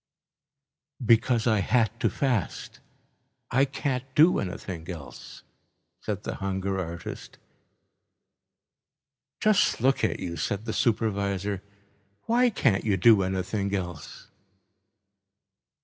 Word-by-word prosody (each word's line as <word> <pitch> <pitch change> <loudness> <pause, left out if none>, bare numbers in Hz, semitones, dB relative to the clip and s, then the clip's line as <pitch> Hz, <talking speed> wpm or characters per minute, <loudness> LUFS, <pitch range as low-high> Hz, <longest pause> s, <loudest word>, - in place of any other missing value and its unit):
"Because 115 +1 +3
I 110 -3 +3
had 115 +2 +2
to - - +2
fast. 125 - -2 0.7
I 135 +3 +4
can't 135 -2 -2
do 160 +4 +6
anything 90 -2 -6
else," 80 -7 -9 0.6
said - - -4
the - - -4
hunger 95 0 -2
artist. 85 -2 -7 2.0
"Just 215 -2 +3
look 135 +3 +2
at - - 0
you," 85 -2 -5
said 100 +6 -2
the 110 - -3
supervisor, 100 -4 0 0.6
"why 245 +2 +3
can't 100 - +1
you 100 -3 +1
do 105 +2 +6
anything 95 +2 -1
else?" 90 -6 -7
100 Hz, 100 wpm, -27 LUFS, 95-120 Hz, 2.0 s, do